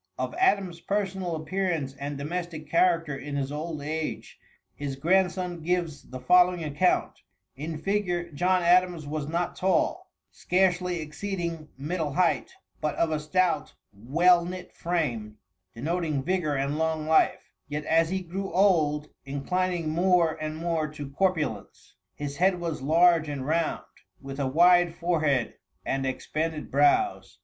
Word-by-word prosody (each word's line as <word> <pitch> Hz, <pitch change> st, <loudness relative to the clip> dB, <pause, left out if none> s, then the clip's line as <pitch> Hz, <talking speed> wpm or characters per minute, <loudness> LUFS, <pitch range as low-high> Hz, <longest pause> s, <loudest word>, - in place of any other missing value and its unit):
Of -, -, -3 dB
Adams' 195 Hz, -, +2 dB
personal 190 Hz, -4 st, -2 dB
appearance 160 Hz, -4 st, -2 dB
and 140 Hz, +1 st, -5 dB
domestic 160 Hz, +1 st, -5 dB
character 165 Hz, -2 st, +2 dB
in 140 Hz, +1 st, -6 dB
his 140 Hz, -1 st, -2 dB
old 155 Hz, 0 st, -4 dB
age, 155 Hz, +1 st, -4 dB, 0.3 s
his 140 Hz, -2 st, -5 dB
grandson 180 Hz, +2 st, +1 dB
gives 170 Hz, -3 st, -2 dB
the 130 Hz, -, -7 dB
following 180 Hz, +5 st, +4 dB
account: 150 Hz, +4 st, +1 dB, 0.4 s
"In 155 Hz, +3 st, -5 dB
figure, 175 Hz, -1 st, -1 dB
John 180 Hz, +4 st, +1 dB
Adams 175 Hz, -2 st, +3 dB
was 145 Hz, 0 st, -4 dB
not 170 Hz, +3 st, -2 dB
tall, 185 Hz, -2 st, 0 dB, 0.2 s
scarcely 180 Hz, -1 st, +1 dB
exceeding 170 Hz, 0 st, -4 dB
middle 150 Hz, +1 st, -2 dB
height, 175 Hz, -, +1 dB, 0.3 s
but 150 Hz, -1 st, -1 dB
of 165 Hz, -, +1 dB
a 155 Hz, -, 0 dB
stout, 160 Hz, 0 st, 0 dB, 0.2 s
well 170 Hz, -, +3 dB
knit 180 Hz, +1 st, -7 dB
frame, 120 Hz, -12 st, -2 dB, 0.4 s
denoting 155 Hz, +2 st, -1 dB
vigor 170 Hz, -4 st, 0 dB
and 140 Hz, +3 st, -1 dB
long 160 Hz, -1 st, 0 dB
life, 160 Hz, 0 st, +2 dB, 0.2 s
yet 150 Hz, +1 st, -4 dB
as 165 Hz, 0 st, +3 dB
he 190 Hz, +1 st, -1 dB
grew 190 Hz, +3 st, -5 dB
old 155 Hz, -6 st, +2 dB
inclining 170 Hz, +5 st, -1 dB
more 175 Hz, -1 st, +3 dB
and 155 Hz, 0 st, -3 dB
more 165 Hz, -2 st, -1 dB
to 150 Hz, -2 st, -8 dB
corpulence. 150 Hz, -, -2 dB, 0.2 s
His 145 Hz, -1 st, -5 dB
head 180 Hz, 0 st, +3 dB
was 165 Hz, -5 st, -3 dB
large 165 Hz, +2 st, +4 dB
and 140 Hz, -3 st, -4 dB
round, 160 Hz, +2 st, 0 dB, 0.3 s
with 135 Hz, +1 st, -8 dB
a 140 Hz, -, 0 dB
wide 175 Hz, +4 st, +5 dB
forehead 155 Hz, -8 st, 0 dB, 0.3 s
and 135 Hz, 0 st, -1 dB
expanded 155 Hz, +4 st, -3 dB
brows. 95 Hz, -10 st, +2 dB
165 Hz, 140 wpm, -27 LUFS, 145-180 Hz, 0.4 s, wide